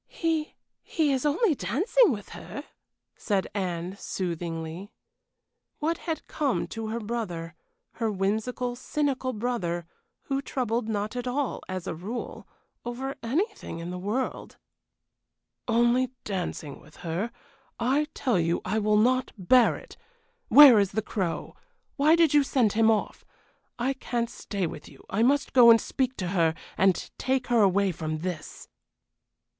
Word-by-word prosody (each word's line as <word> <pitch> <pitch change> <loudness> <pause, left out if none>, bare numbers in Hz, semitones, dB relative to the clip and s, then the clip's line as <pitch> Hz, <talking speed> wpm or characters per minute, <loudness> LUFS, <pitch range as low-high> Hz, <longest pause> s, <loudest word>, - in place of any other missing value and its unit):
"He 325 -2 -2 0.3
he 305 -4 0
is 265 +2 0
only 330 +5 +3
dancing 310 - +3
with 205 -4 -5
her," - - -8 0.5
said 200 -4 0
Anne, 180 -2 -3
soothingly. 170 +1 -4 0.9
What 325 +2 -1
had 320 - -2
come 290 -4 -1
to 225 -1 -5
her 225 +2 -2
brother, 205 -8 -4 0.4
her 225 -2 -2
whimsical, 220 +5 -1
cynical 265 0 -1
brother, 205 -8 -2 0.4
who 275 -1 -1
troubled 240 -4 -2
not 210 +2 -2
at 245 0 -3
all, 265 +1 -1
as 185 -2 -4
a - - -3
rule, 200 +9 -6 0.4
over 255 +3 -4
anything 325 - -2
in 170 +1 -5
the 180 - -5
world? 215 +8 -3 1.1
"Only 240 +2 +3
dancing 180 -7 -4
with 150 - -18
her! 180 +8 -2 0.5
I 270 +5 +2
tell 245 -9 +1
you 165 +1 +1
I 220 - 0
will 210 0 +2
not 255 +4 +2
bear 230 +6 +4
it. - - -12 0.5
Where 275 -6 +9
is 195 -1 +1
the 220 +1 0
Crow? 185 -6 -3 0.4
Why 300 +3 +5
did 330 -3 +4
you 295 - +6
send 255 -6 +2
him 225 0 +4
off? 215 -2 0 0.5
I 250 +3 0
can't 235 -3 -3
stay 200 -3 -3
with 155 -2 -7
you; 140 - -17
I 200 - +1
must 280 +4 +2
go 245 -2 +8
and 230 0 +8
speak 260 +2 -2
to 180 -2 -3
her, 165 -4 +2 0.2
and 190 -2 +2
take 260 -1 0
her 240 -2 +4
away 200 0 +3
from 155 -1 -4
this." 175 -4 -6
225 Hz, 150 wpm, -27 LUFS, 185-260 Hz, 1.1 s, Where